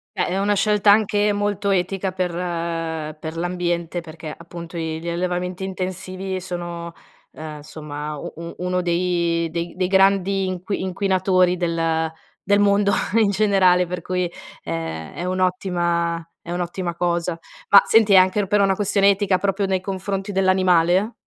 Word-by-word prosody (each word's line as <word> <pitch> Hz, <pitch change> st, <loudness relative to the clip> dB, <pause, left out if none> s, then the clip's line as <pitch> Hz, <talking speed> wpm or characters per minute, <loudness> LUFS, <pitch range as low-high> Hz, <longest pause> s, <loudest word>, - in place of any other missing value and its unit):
Eh, -, -, +1 dB
è 185 Hz, +2 st, -1 dB
una 205 Hz, +1 st, +2 dB
scelta 210 Hz, 0 st, +4 dB
anche 210 Hz, 0 st, +3 dB
molto 205 Hz, 0 st, -1 dB
etica 190 Hz, 0 st, 0 dB
per 185 Hz, -1 st, -2 dB, 0.9 s
per 160 Hz, +1 st, -6 dB
l'ambiente, 175 Hz, -1 st, -2 dB
perché 155 Hz, -2 st, -8 dB
appunto 170 Hz, 0 st, -9 dB
gli 160 Hz, -1 st, -3 dB
gli 170 Hz, -, -8 dB
allevamenti 180 Hz, +1 st, -2 dB
intensivi 185 Hz, 0 st, -4 dB
sono, 175 Hz, -2 st, -6 dB, 0.4 s
uhm, 155 Hz, -1 st, -8 dB
insomma 150 Hz, 0 st, -7 dB, 0.4 s
uno 180 Hz, 0 st, -1 dB
dei 170 Hz, -1 st, 0 dB
dei 175 Hz, +2 st, -2 dB
grandi 195 Hz, 0 st, +3 dB
inqui 185 Hz, +2 st, -3 dB
inquinatori 185 Hz, -1 st, +2 dB
del 165 Hz, -2 st, 0 dB, 0.3 s
del 200 Hz, +1 st, +2 dB
mondo 200 Hz, 0 st, +3 dB, 0.3 s
in 210 Hz, -, +3 dB
generale 190 Hz, -3 st, +3 dB
per 180 Hz, 0 st, -5 dB
cui 180 Hz, 0 st, -1 dB, 0.3 s
è 80 Hz, -1 st, -4 dB
è 175 Hz, -, -4 dB
un'ottima 175 Hz, -2 st, 0 dB, 0.2 s
è 170 Hz, -, -8 dB
un'ottima 175 Hz, 0 st, -3 dB
cosa, 170 Hz, -1 st, -1 dB, 0.3 s
ma 200 Hz, -, +8 dB
senti 220 Hz, -3 st, +5 dB
anche 185 Hz, +2 st, +4 dB
per 205 Hz, +1 st, +3 dB
una 195 Hz, -1 st, +3 dB
questione 200 Hz, 0 st, +3 dB
etica 195 Hz, -1 st, +1 dB
proprio 195 Hz, 0 st, 0 dB
nei 190 Hz, -1 st, 0 dB
confronti 195 Hz, +1 st, -3 dB
dell'animale? 185 Hz, +1 st, +3 dB
180 Hz, 140 wpm, -22 LUFS, 170-195 Hz, 0.9 s, ma